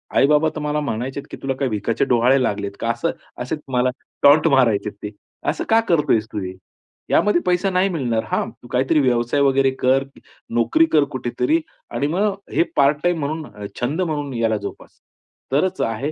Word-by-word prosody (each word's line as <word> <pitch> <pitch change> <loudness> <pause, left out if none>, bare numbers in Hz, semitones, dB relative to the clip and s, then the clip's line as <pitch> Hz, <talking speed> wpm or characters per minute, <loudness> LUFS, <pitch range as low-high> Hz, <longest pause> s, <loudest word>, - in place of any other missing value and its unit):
आई-बाबा 150 +3 +4
तर - - -3
मला 150 0 -1
म्हणायचे, 135 0 -3
की - - -7
"तुला 135 0 -1
काही 135 -1 -1
भिकाचे 110 +4 0
डोहाळे 125 +2 +3
लागलेत 100 -3 -2
का?" 115 - -2
असं 120 - -1 0.3
असे 125 +6 -2 0.2
मला 125 +1 +3 0.3
टॉन्‍ट 150 +3 +6
मारायचेत 115 -7 +3
ते. 105 - -3 0.4
"असं - - -2
का 225 0 +5
करतोयेस 145 -10 +2
तू 105 - -3
हे? 95 0 -5 0.6
यामध्ये 210 -4 +3
पैसा 180 +2 +2
नाही 185 +1 +2
मिळणार. 125 -10 -1
हां, - - 0
तू 120 - -17
काहीतरी 135 +5 +2
व्यवसाय 120 +1 +1
वगैरे 135 -1 +3
कर, 130 +1 +3 0.5
नोकरी 215 - +3
कर, 150 - +6
कुठेतरी 125 +5 0 0.3
आणि 145 - -1
मग 195 +5 +1 0.2
हे - - +4
पार्ट 140 +1 +4
टाईम 175 -1 +1
म्हणून 155 +2 -3
अ, 105 0 -9 0.2
छंद 150 +9 -1
म्हणून 145 -5 -2
याला 115 -2 +1
जोपास. - - -9 0.5
तरच 185 +7 +1
आहे 115 +7 -1
135 Hz, 180 wpm, -21 LUFS, 120-155 Hz, 0.6 s, टॉन्‍ट